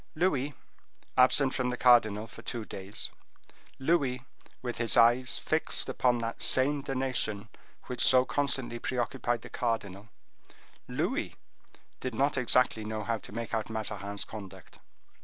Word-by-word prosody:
Louis, 150 Hz, -5 st, 0 dB, 0.6 s
absent 130 Hz, +1 st, +5 dB
from 130 Hz, -2 st, 0 dB
the 125 Hz, -, -3 dB
cardinal 110 Hz, -4 st, +4 dB
for 110 Hz, -, -12 dB
two 115 Hz, -3 st, -4 dB
days; 95 Hz, 0 st, -2 dB, 0.7 s
Louis, 135 Hz, -3 st, +1 dB, 0.4 s
with 120 Hz, -2 st, -4 dB
his 115 Hz, -1 st, +2 dB
eyes 120 Hz, +2 st, +5 dB
fixed -, -, 0 dB
upon 125 Hz, -1 st, +2 dB
that 115 Hz, -1 st, -4 dB
same 140 Hz, +2 st, +3 dB
donation 130 Hz, -6 st, -2 dB, 0.3 s
which 125 Hz, -, -2 dB
so 130 Hz, 0 st, +6 dB
constantly 130 Hz, -4 st, -1 dB
preoccupied 120 Hz, -1 st, -2 dB
the -, -, -10 dB
cardinal; 105 Hz, -3 st, -3 dB, 0.8 s
Louis -, -, -2 dB, 0.6 s
did 130 Hz, -3 st, -4 dB
not 140 Hz, +4 st, +2 dB
exactly 125 Hz, -3 st, +3 dB
know 110 Hz, 0 st, -4 dB
how 115 Hz, +1 st, -1 dB
to -, -, -11 dB
make 115 Hz, +2 st, -5 dB
out 110 Hz, -1 st, -1 dB
Mazarin's 105 Hz, -2 st, -4 dB
conduct. 95 Hz, -4 st, -11 dB
120 Hz, 135 wpm, -30 LUFS, 110-130 Hz, 0.8 s, so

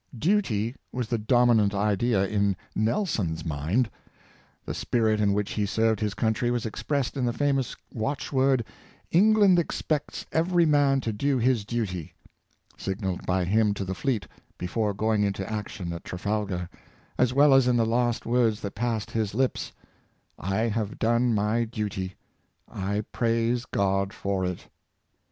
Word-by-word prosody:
Duty 120 Hz, -, +1 dB, 0.2 s
was 125 Hz, -3 st, -3 dB
the 120 Hz, -, 0 dB
dominant 110 Hz, -2 st, +3 dB
idea 105 Hz, +1 st, +2 dB
in 100 Hz, -1 st, +1 dB, 0.2 s
Nelson's 110 Hz, -, -1 dB
mind. 80 Hz, -, 0 dB, 0.8 s
The -, -, -3 dB
spirit 110 Hz, -3 st, +1 dB
in 100 Hz, -1 st, +3 dB
which 105 Hz, 0 st, -1 dB
he 105 Hz, -1 st, -1 dB
served 110 Hz, 0 st, +1 dB
his 105 Hz, -2 st, -2 dB
country 110 Hz, +2 st, 0 dB
was 120 Hz, -1 st, -1 dB
expressed 135 Hz, +5 st, -2 dB
in 135 Hz, -, -1 dB
the 120 Hz, -, +2 dB
famous 135 Hz, -1 st, 0 dB, 0.2 s
watch 135 Hz, +6 st, -3 dB
word, 130 Hz, -3 st, +3 dB, 0.2 s
" -, -, -28 dB
England 200 Hz, 0 st, +5 dB
expects 155 Hz, -2 st, -2 dB
every 170 Hz, +1 st, +3 dB
man 145 Hz, -3 st, +3 dB
to 115 Hz, -3 st, -2 dB
do 140 Hz, +6 st, +1 dB
his 120 Hz, -3 st, +1 dB
duty," 100 Hz, -8 st, -3 dB, 0.6 s
signalled 95 Hz, -1 st, -4 dB
by 90 Hz, 0 st, +1 dB
him 105 Hz, +2 st, +2 dB
to 100 Hz, -, -3 dB
the 95 Hz, -, -3 dB
fleet 105 Hz, -, -1 dB, 0.3 s
before 100 Hz, +3 st, -1 dB
going 110 Hz, +1 st, +1 dB
into 100 Hz, -1 st, -1 dB
action 105 Hz, -5 st, -4 dB
at 85 Hz, -, -7 dB
Trafalgar, 100 Hz, -1 st, -2 dB, 0.5 s
as 125 Hz, -1 st, +4 dB
well 140 Hz, +2 st, +5 dB
as 135 Hz, -2 st, +5 dB
in 125 Hz, -1 st, +3 dB
the 115 Hz, -, +3 dB
last 120 Hz, +1 st, 0 dB
words 115 Hz, -3 st, +2 dB
that 100 Hz, -, -5 dB
passed 115 Hz, -1 st, -2 dB
his 110 Hz, -3 st, -1 dB
lips 130 Hz, +1 st, 0 dB, 0.3 s
— -, -, -39 dB
'' -, -, -27 dB, 0.2 s
I 110 Hz, -, +1 dB
have 110 Hz, -2 st, -1 dB
done 120 Hz, +2 st, +2 dB
my 105 Hz, +3 st, +1 dB
duty; 105 Hz, -5 st, -4 dB, 0.5 s
I 100 Hz, +2 st, -2 dB
praise 115 Hz, +1 st, +1 dB
God 100 Hz, 0 st, 0 dB
for 100 Hz, -1 st, -2 dB
it!" 90 Hz, -1 st, -5 dB
110 Hz, 160 wpm, -26 LUFS, 100-125 Hz, 0.8 s, England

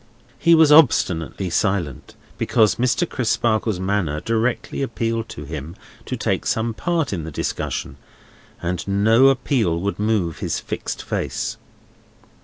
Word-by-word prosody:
He 170 Hz, -1 st, +5 dB
was 160 Hz, -2 st, +5 dB
obstinately 95 Hz, -, +3 dB
silent, 90 Hz, -, -1 dB, 0.2 s
because 110 Hz, -4 st, +3 dB
Mr. 125 Hz, +8 st, +1 dB
Crisparkle's 115 Hz, -, 0 dB
manner 95 Hz, -6 st, -1 dB
directly 115 Hz, -, -1 dB
appealed 115 Hz, -3 st, -2 dB
to 75 Hz, -, -8 dB
him 75 Hz, +3 st, -7 dB, 0.3 s
to -, -, -3 dB
take -, -, -1 dB
some 115 Hz, +1 st, 0 dB
part 165 Hz, -, -1 dB
in 85 Hz, -4 st, -3 dB
the 80 Hz, -, -6 dB
discussion, 70 Hz, -1 st, -4 dB, 0.7 s
and 85 Hz, +1 st, -3 dB
no 110 Hz, +6 st, +4 dB
appeal 125 Hz, -, +1 dB
would 100 Hz, +3 st, -3 dB
move 105 Hz, -7 st, 0 dB
his -, -, -2 dB
fixed -, -, -5 dB
face. -, -, -3 dB
110 Hz, 130 wpm, -21 LUFS, 90-120 Hz, 0.7 s, He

